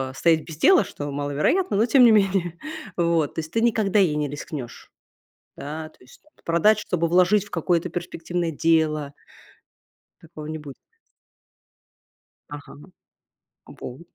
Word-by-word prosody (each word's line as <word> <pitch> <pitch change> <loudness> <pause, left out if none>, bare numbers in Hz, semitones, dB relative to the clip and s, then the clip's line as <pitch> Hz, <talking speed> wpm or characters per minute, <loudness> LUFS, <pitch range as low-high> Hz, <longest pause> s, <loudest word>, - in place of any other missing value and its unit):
стоять, 160 +2 +3
э, - - -14
без 155 -2 -10
дела, 375 - +5
что 145 0 -7
маловероятно, 145 - 0
но 220 - +3
тем 250 +1 +5
не 235 - +7
менее. 195 -5 +1 0.4
Вот. 170 -4 +1
То - - -3
есть 160 0 -6
ты 225 - 0
никогда 215 -3 +2
ей 170 -6 +3
не 150 -1 -1
рискнешь? 145 -3 -8 0.6
Да, 155 +2 -7
то - - -27
есть, 125 - -19 0.2
продать, 180 +6 +3
чтобы 170 -5 -1
вложить 185 +4 +3
в 205 - -17
какое-то 170 0 0
перспективное 175 0 -4
дело? 155 -2 +1 1.1
Такого 155 -2 -11
не 155 0 -4
будет? 145 -3 -11 1.7
Ага. 145 -1 -10 0.9
Вот. 125 +5 -10
165 Hz, 140 wpm, -23 LUFS, 150-195 Hz, 1.7 s, не